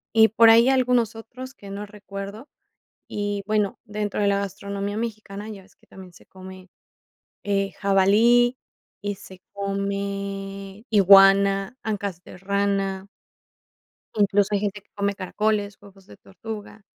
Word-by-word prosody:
Y 220 0 +7
por 225 +1 +6
ahí 230 +3 +6
algunos 250 -4 +2
otros 255 +4 -10
que 200 -4 -11
no 205 +1 -6
recuerdo, 200 +3 -9 0.6
y 205 -1 -3
bueno, 210 -2 0
dentro 210 -1 -3
de 205 - +2
la 200 0 +2
gastronomía 200 +1 -4
mexicana 215 -2 -5
ya 200 -3 -9
ves 195 - -24
que - - -29
también 185 -2 -13
se 180 - -19
come, 185 0 -12 0.7
eh, 195 -1 -1
jabalí, 220 +6 +4 0.5
y 205 0 -3
se 190 -1 -14
come 200 0 -4
iguana, 195 0 +6
ancas 200 -5 -4
de - - -12
rana. 195 0 -1 1.1
Incluso 205 0 +2
hay 205 - +2
gente 205 0 -3
que - - -41
come 200 0 -1
caracoles, 205 +1 -1
huevos 195 -1 -17
de 200 - -15
tortuga. 210 +2 -9
200 Hz, 140 wpm, -24 LUFS, 195-210 Hz, 1.1 s, Y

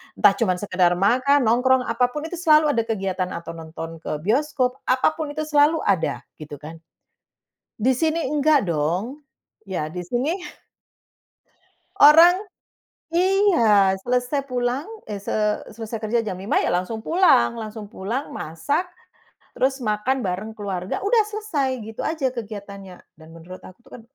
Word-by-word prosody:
Entah - - +6
cuma 195 -6 +2
sekedar 185 -3 +2
makan, 255 +9 +3
nongkrong 255 +3 +3
apapun 250 +5 -1
itu 355 - -6
selalu 305 -3 +4
ada 230 - +1
kegiatan 190 -4 -2
atau 170 0 -6
nonton 165 0 -8
ke 150 -2 -5
bioskop, 255 - 0
apa 255 +4 +3
pun 300 -2 -4
itu 310 - -2
selalu 300 +1 +3
ada 185 -5 0 0.2
gitu 150 -1 -8
kan. 160 +2 -10 1.0
Di 255 +5 +3
sini 320 +3 0
nggak 295 -7 +3
dong. 175 - -2 0.4
Ya 185 -7 -4
di 180 0 -5
sini 245 - -1 1.7
orang 330 +4 +8 0.8
iya, 340 - +4
selesai 250 +3 0
pulang, 245 +2 -1 0.2
eh, 210 - -4
se 200 - -6 0.4
selesai 225 0 -5
kerja 225 +2 +1
jam 190 - -3
5:00 190 +3 0
ya - - 0
langsung 185 +6 -1
pulang, 320 - +3
langsung 220 -1 -7
pulang 240 +8 -5
masak, 280 - -2 0.7
terus 265 +1 0
makan 240 +4 -1
bareng 195 +2 -4
keluarga. 195 -3 -4
Udah 435 +2 +3
selesai 320 - -2
gitu 220 +1 -7
aja 310 -5 0
kegiatannya 200 -5 -9 0.2
dan 160 0 -15
menurut 170 +3 -11
aku 185 - -13
itu - - -21
kan - - -14
230 Hz, 145 wpm, -22 LUFS, 190-285 Hz, 1.7 s, orang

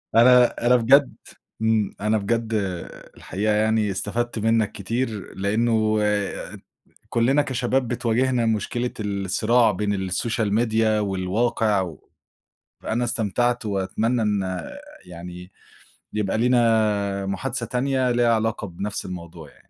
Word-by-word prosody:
أنا 120 0 +5
أنا 125 - +6
بجد 130 +4 +4 0.5
إمم. 110 -2 +1
أنا 110 +1 +2
بجد 115 +2 -1 0.7
الحقيقة 105 +3 -1
يعني 110 -1 +1
استفدت 110 +5 -3
منّك 110 -1 +1
كتير 110 0 -4
لإنّه 110 +2 +1 0.6
ات - - -10 0.5
كُلّنا 130 +5 +2
كشباب 125 -1 -1
بتواجهنا 120 0 +1
مشكلة 115 +3 -1
الصراع 105 +3 +1
بين 100 -1 -2
الsocial 110 +3 -1
media 115 -1 +1 0.2
والواقع 105 +2 0
و 90 -4 -7 0.7
فأنا 120 +2 -2
استمتعت 120 +1 0
وأتمنّى 110 +4 -1
إن 95 -4 -1 0.4
يعني 90 +1 -10 0.6
يبقى 105 0 -1
لينا 110 -5 +2
محادثة 120 +5 -3
تانية 130 +1 0
ليها 120 -1 +3
علاقة 110 -1 -1
بنَفْس 100 +3 -5
الموضوع 85 -3 -8
يعني. - - -21
110 Hz, 115 wpm, -23 LUFS, 100-120 Hz, 0.7 s, أنا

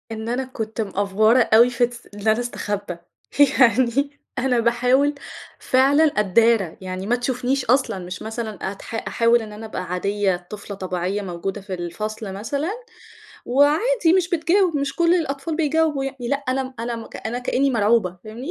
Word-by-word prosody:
إن 220 0 -5
أنا 250 +2 -1
كُنت 225 -4 -5
مأفْوَرة 210 +3 +2
أوي 235 +3 +7
في 245 0 +2
تس 240 -1 -13
إن 205 +1 -6
أنا 220 +1 +4
أستخبّى، 205 -6 -4 0.6
يعني 260 +4 +3 0.2
أنا 250 -1 +1
باحاول 250 +5 +2 0.4
فعلًا 275 +4 +3
أدّارى، 215 - +2
يعني 185 +1 -5
ما 240 - +3
تشوفنيش 250 +2 -1
أصلًا. 255 -5 +1
مش 180 0 -7
مثلًا 220 -3 -4
أتح 200 +3 -9
أحاول 230 0 +3
إن 215 -1 -8
أنا 215 +1 -8
أبقى 215 -4 -5
عادية، 185 0 -1
طفلة 205 -1 -7
طبيعية 185 +1 -3
موجودة 190 +2 -5
في 195 -1 -7
الفصل 205 +4 -5
مثلًا، 280 - -3 0.8
وعادي 320 - +3
مش 365 -2 +1
بتجاوِب، 345 0 +2
مش 280 -1 -2
كُل 340 0 +4
الأطفال 305 -2 -2
بيجاوبوا 315 -3 +1
يعني 265 -3 -5
لأ، 280 - +2
أنا 260 0 -1
أنا 230 -1 -4 0.2
أنا 235 +2 -3
كإنّي 265 +2 +1
مرعوبة، 210 -5 +2
فاهمني؟ 230 +7 -7
235 Hz, 155 wpm, -22 LUFS, 205-270 Hz, 0.8 s, أوي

